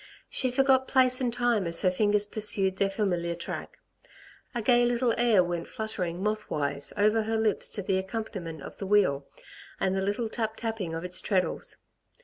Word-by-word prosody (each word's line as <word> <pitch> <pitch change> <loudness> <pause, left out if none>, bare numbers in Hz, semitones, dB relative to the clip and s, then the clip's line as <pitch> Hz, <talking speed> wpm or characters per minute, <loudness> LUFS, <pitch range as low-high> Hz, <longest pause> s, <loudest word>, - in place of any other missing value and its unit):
She 255 - +3
forgot 265 +1 +3
place 255 -1 +3
and 245 -2 0
time 235 -5 0
as 170 +3 +3
her 185 - +4
fingers 205 +2 +2
pursued 205 -3 +2
their 195 0 +1
familiar 175 -4 -1
track. 170 - -7 0.8
A - - 0
gay 240 +1 +4
little 240 0 +1
air 230 -5 +4
went 175 -1 -4
fluttering 190 -6 -4
moth 215 0 -2
wise 140 -1 -2
over 215 +2 +3
her 220 +1 -1
lips 220 -2 +2
to 200 - -3
the 190 0 0
accompaniment 190 -6 -6
of - - -10
the 195 - -5
wheel, 185 -9 +2 0.5
and 190 0 0
the 190 - 0
little 205 +4 -1
tap 220 -1 -3
tapping 220 -8 -4
of 165 - -5
its 180 0 -1
treadles. 185 -3 -1
205 Hz, 180 wpm, -27 LUFS, 180-225 Hz, 0.8 s, her